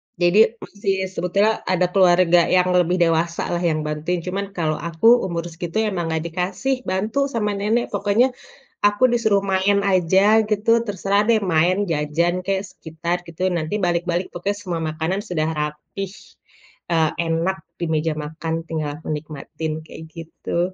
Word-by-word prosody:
Jadi, 195 +6 +4
masih 200 -1 -2 0.2
sebetulnya 200 +5 +1
ada 180 -1 +2
keluarga 175 -2 +5
yang 180 0 +3
lebih 180 0 +3
dewasa 165 0 +1
lah 175 - 0
yang 155 -1 -1
bantuin, 155 +3 -2
cuman 195 +2 -3
kalau 155 -3 -1
aku 170 +5 0 0.2
umur 170 -2 -3
segitu 165 +3 -5
emang 190 -6 -1
nggak 160 0 -1
dikasih 185 +10 -1
bantu 215 +9 0
sama 225 -6 -1
nenek. 225 +4 0
Pokoknya 205 +5 +2 0.5
aku 205 +5 +4
disuruh 230 -4 +2
main 195 +1 +1
aja 190 +4 +4
gitu, 215 +2 +2
terserah 200 -1 0
deh, 225 0 +3
main 185 +1 +1
jajan 165 +3 0
kek, 195 -1 +1
sekitar, 170 +1 -4
gitu 175 +2 -3
ya, - - 0
nanti 180 +7 -2
balik-balik 175 0 0
pokoknya 200 +4 -2
semua 175 -3 -3
makanan 160 +6 -2
sudah 160 -7 -1
rapih, 150 +6 -4 0.8
eee, 160 -2 +3 0.2
enak 165 +4 0 0.2
di 170 - -1
meja 155 +1 0
makan, 160 +2 -5
tinggal 155 -3 -3
aku - - -13
nikmatin, 155 +1 -6
kayak 160 - -10
gitu. 170 +2 -3
180 Hz, 155 wpm, -21 LUFS, 165-200 Hz, 0.8 s, keluarga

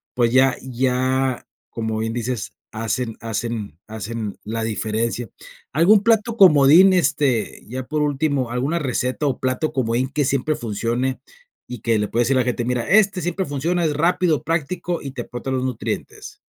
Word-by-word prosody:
pues, 120 -2 +2
ya 130 0 +5
ya, 130 0 0 0.2
como 110 -1 -3
bien 115 0 -2
dices, 120 -2 -3 0.2
hacen 115 +1 -3
hacen 115 -6 -4
hacen 110 -1 -5
la 110 +1 -3
diferencia. 110 +1 -2 0.4
¿Algún 190 +7 +5
plato 230 0 +2
comodín, 175 +2 +7
este, 140 -9 +1
ya 130 +3 -5
por 150 +2 -2
último, 140 -3 0
alguna 135 +8 -1
receta 130 0 -1
o 130 - -1
plato 130 +5 -1
comodín 125 0 0
que 145 +1 0
siempre 140 +3 0
funcione 120 +4 -2 0.5
y 125 -2 -7
que 115 -3 +1
le 105 - 0
puedes 120 0 +1
decir 135 0 +2
a - - +4
la 125 - -2
gente: 120 -1 -1
"Mira, 125 -1 -1
este 200 -2 +4
siempre 175 +3 -2
funciona, 165 +5 -1
es 150 - +1
rápido, 165 -1 +2
práctico, 170 +2 -2
y 140 - -6
te 125 -2 -5
aporta 120 +2 -6
los 130 -1 -1
nutrientes"? 130 -4 -5
130 Hz, 165 wpm, -21 LUFS, 115-150 Hz, 0.5 s, comodín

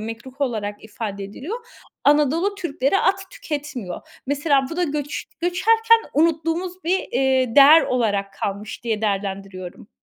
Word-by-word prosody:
mekruh 235 +5 -8
olarak 215 -6 -2
ifade 205 -2 -5
ediliyor. 280 - -6 0.5
Anadolu 300 +7 +3
Türkleri 340 -2 0
at 385 0 0
tüketmiyor. 290 - -5 0.3
Mesela 280 -1 +2
bu 330 - -5
da 355 - +2
göç 290 -2 -3 0.2
göçerken 450 +6 +4
unuttuğumuz 330 +3 0
bir, 365 +3 +2
iii, 260 -1 +1
değer 300 +3 +9
olarak 205 -5 0
kalmış 200 +3 -5
diye 220 -2 -1
değerlendiriyorum. 195 -2 -4
275 Hz, 125 wpm, -22 LUFS, 215-335 Hz, 0.5 s, değer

